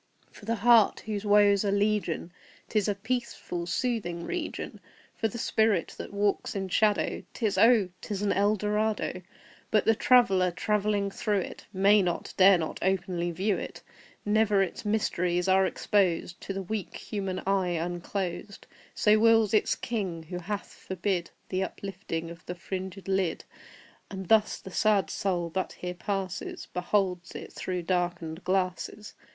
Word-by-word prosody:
For 205 - -14
the 230 +2 0
heart 230 0 +5
whose 210 -1 -4
woes 205 -1 +5
are 200 - +1
legion 200 -4 0 0.4
'Tis 215 -2 +1
a 205 - +1
peaceful, 220 -5 -3
soothing 185 -7 -1
region 350 -3 -4 0.4
For 225 - 0
the 220 - -7
spirit 220 -5 +1
that - - -6
walks 205 0 0
in 195 -1 -3
shadow 210 +2 +2
'Tis 220 -5 0
oh, 225 -4 +6
'tis 205 -1 -4
an 205 - +2
Eldorado! 210 -1 0 0.5
But 215 - +2
the 225 - +5
traveller, 220 -7 +4
travelling 205 +2 0
through 205 0 0
it, - - -8
May 200 +1 +5
not 175 -2 -2
dare 190 0 +7
not 160 -2 -4
openly 180 -2 0
view 190 +4 0
it; - - -8 0.4
Never 210 -1 +3
its 185 - -5
mysteries 180 -4 0
are 190 0 +4
exposed 180 -3 0
To 195 - -4
the 195 0 -4
weak 205 +1 -4
human 195 -3 -4
eye 185 -3 +1
unclosed; 175 +3 -4 0.3
So 215 0 +4
wills 225 -2 +4
its 215 - +3
King, 190 -8 -3
who 180 +3 -6
hath 200 +3 -5
forbid 185 -1 -2 0.2
The 185 0 0
uplifting 185 -4 -5
of 165 -1 -12
the 180 - -4
fringed 190 +2 -6
lid; 190 -4 0 0.7
And 190 -2 -7
thus 220 -1 +4
the 190 - -11
sad 200 -4 +2
Soul 175 -4 -1
that 185 +2 -2
here 180 0 -5
passes 190 0 -4
Beholds 180 0 0
it - - -7
but - - -20
through 180 -2 -3
darkened 175 -1 -2
glasses. 185 +2 -2
195 Hz, 155 wpm, -28 LUFS, 180-210 Hz, 0.7 s, dare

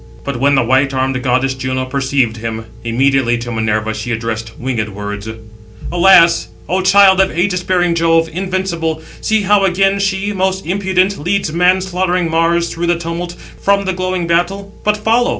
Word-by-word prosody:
But 140 -3 -4
when 140 +2 +3
the 130 - +3
white 135 +3 +1
armed 130 0 -1
goddess 130 +1 +1
Juno 130 0 -3
perceived 130 -3 -1
him, 110 0 -5 0.2
immediately 120 +1 +1
to 120 +1 -6
Minerva 110 -1 -1
she 110 +2 -6
addressed 115 -1 -4
winged 120 -4 -3
words: 105 +1 -6 0.6
"Alas! 175 -1 +5 0.2
O 185 +1 0
child 190 0 +5
of 190 -4 -1
aegis 180 0 0
bearing 180 -2 +1
Jove, 165 0 +2
invincible, 175 -3 -2 0.2
see 220 -1 +1
how 200 0 +3
again 195 +1 +2
she, 200 +1 -1
most 190 0 -1
impudent, 190 +1 0
leads 175 0 -1
man 180 +2 +3
slaughtering 180 -2 -1
Mars 170 +1 +1
through 170 +1 -3
the 170 0 +2
tumult, 170 +1 -5 0.3
from 200 0 +2
the 190 - -1
glowing 185 -1 -2
battle. 185 +4 -1
But 210 0 +1
follow." 230 +3 +1
170 Hz, 170 wpm, -15 LUFS, 130-190 Hz, 0.6 s, Alas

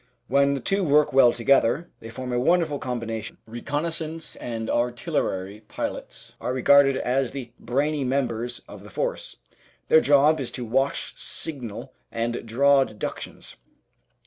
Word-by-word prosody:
When 140 +1 +3
the - - -2
two 195 +9 0
work 150 -3 +3
well 130 -3 +7
together 130 +5 +2
they 115 - -9
form 125 +2 -5
a 120 - +1
wonderful 160 +1 +2
combination. 115 -3 -4
Reconnaissance 155 +6 -3
and 115 -2 -5
artillery 120 - -1
pilots - - -6
are 125 - -2
regarded 135 +1 +5
as 130 0 0
the 130 -4 -6
brainy 140 +4 0
members 125 -2 -2
of - - -11
the - - -12
Force. - - -3 0.5
Their 160 - +7
job 145 +2 +4
is 130 - -3
to 125 - -5
watch, 135 +5 0
signal, 125 -9 -4 0.2
and 115 +1 -2
draw 140 +4 +4
deductions. 110 -5 -7
130 Hz, 140 wpm, -25 LUFS, 120-145 Hz, 0.5 s, well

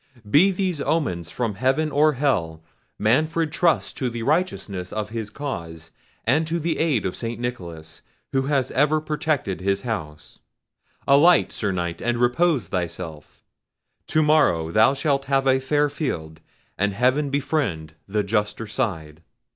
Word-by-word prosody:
Be 150 - +5
these 185 -5 -1
omens 90 - -1
from 115 +2 -2
heaven 135 +8 +1
or 150 +2 +4
hell, 85 - -1 0.3
Manfred 155 +8 +1
trusts 170 +1 +1
to 130 - -2
the 115 -1 -5
righteousness 120 - -1
of 105 -1 -3
his 110 -2 -4
cause 85 - -6 0.3
and 150 +7 +2
to 170 +1 -1
the 165 0 -1
aid 150 -10 +1
of 90 - -2
St. 115 -1 -4
Nicholas, 85 -10 -6 0.3
who 135 0 0
has 140 -3 +1
ever 150 +3 +3
protected 150 - -2
his 100 +1 0
house. 75 - -6 0.7
Alight, 155 +6 +5
Sir 105 -3 -2
Knight, 85 -2 -3
and 120 0 0
repose 125 +4 +2
thyself. 85 -4 -5 0.6
To 155 +1 +2
morrow 115 - +3
thou 110 +8 +4
shalt 140 -1 0
have 135 0 +1
a 130 0 +4
fair 145 +2 +1
field, 80 - -4 0.4
and 100 +1 +1
heaven 130 +6 +2
befriend 135 - -1
the 105 +1 0
juster 105 +2 -1
side!" 85 - -3
125 Hz, 145 wpm, -23 LUFS, 95-150 Hz, 0.7 s, Be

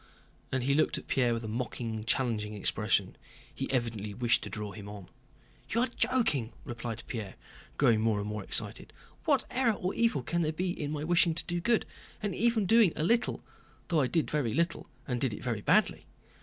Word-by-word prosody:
And 130 -1 0
he 140 +2 +2
looked 155 - +2
at - - -8
Pierre 125 -3 +2
with 115 0 -2
a - - -4
mocking, 110 -1 -3
challenging 110 -4 0
expression. 100 -1 +1 0.4
He - - -4
evidently 110 -5 -2
wished 120 0 +2
to - - -5
draw 105 -2 -5
him 100 -1 -9
on. 100 -3 -9 0.6
"You 230 - +1
are 255 - +1
joking," 145 - +1
replied 115 -3 -5
Pierre, 110 -6 -5 0.4
growing 110 -2 +4
more 110 -2 +2
and 100 - -3
more 105 -1 -4
excited. - - 0 0.3
"What - - +3
error 250 -3 +2
or 185 -2 -2
evil 230 - +1
can 170 +6 0
there 155 -1 0
be 180 +3 -1
in 150 -4 -4
my 150 -1 -3
wishing 170 0 +3
to - - -2
do 175 0 -2
good, 235 +4 +2 0.3
and 205 -2 -2
even 230 -1 +2
doing 220 -3 +5
a 150 - -1
little—though 180 -6 -1
I 130 - +2
did 165 +3 0
very 135 -8 0
little 170 0 0 0.2
and 125 -2 -2
did 125 -6 0
it - - -10
very 115 -4 -2
badly? - - +2
125 Hz, 195 wpm, -30 LUFS, 110-175 Hz, 0.6 s, doing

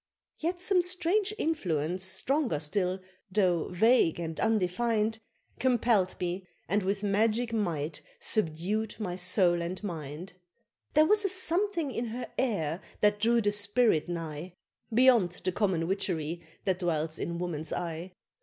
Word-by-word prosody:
Yet 350 +3 -2
some 365 0 +3
strange 365 +3 +1
influence 185 - -1
stronger 250 - 0
still, 180 +4 0 0.3
though 185 -4 +2
vague 185 -2 +3
and 165 -1 -4
undefin'd, 220 +2 +1 0.4
Compell'd 235 -6 +2
me, 180 +1 -3 0.2
and 205 +2 +1
with 195 +2 -1
magic 220 +3 +1
might 165 -8 -2 0.2
subdued 210 +3 0
my 185 -5 -3
soul 180 -1 +2
and 175 +3 -5
mind; 165 -1 -6 0.6
There 305 +1 +7
was 425 +4 +4
a 390 - +1
something 360 -3 +1
in 240 0 -2
her 235 +1 -5
air 180 - 0 0.2
that 210 0 +3
drew 230 +2 +3
the 205 -1 +2
spirit 205 -4 +2
nigh, 165 0 -5 0.4
Beyond 235 -6 +5
the 185 - +1
common 180 -4 0
witchery 170 -4 -2 0.2
that 190 -2 +1
dwells 160 -3 -1
in 170 0 -3
woman's 165 -3 -3
eye! 170 +1 -4
195 Hz, 135 wpm, -29 LUFS, 175-235 Hz, 0.6 s, There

